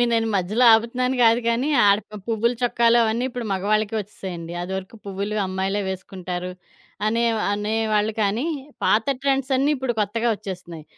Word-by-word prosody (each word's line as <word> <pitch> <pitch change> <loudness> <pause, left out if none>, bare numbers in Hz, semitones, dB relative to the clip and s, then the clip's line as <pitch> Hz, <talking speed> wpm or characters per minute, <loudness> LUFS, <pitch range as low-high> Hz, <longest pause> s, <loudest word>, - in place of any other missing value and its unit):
మీ - - +5
నేను 225 -1 +2
మధ్యలో 200 +6 +1
ఆపుతున్నాను 250 +3 +1
కాదు 230 +1 +5
కానీ, 235 +5 +1 0.2
ఆడ 200 0 +5 0.3
పువ్వులు 230 +1 +1
చొక్కాలు 235 -1 +3
అవన్నీ 230 +2 0
ఇప్పుడు 245 -1 -5
మగవాళ్ళకే 210 +3 0
వచ్చేసాయండి. 185 -5 -7
అదివరకు 190 +4 -5
పువ్వులు 200 +2 -3
అమ్మాయిలే 190 +2 -1
వేసుకుంటారు. 185 -1 -5 0.6
అనే 230 +2 +1 0.3
అనేవాళ్ళకనీ 215 +1 0 0.4
పాత 220 +1 +3 0.2
ట్రెండ్సన్నీ 270 0 +1
ఇప్పుడు 260 -2 -1
కొత్తగా 230 +3 0
వచ్చేస్తున్నాయి. 180 -6 -8
215 Hz, 130 wpm, -23 LUFS, 195-235 Hz, 0.6 s, మీ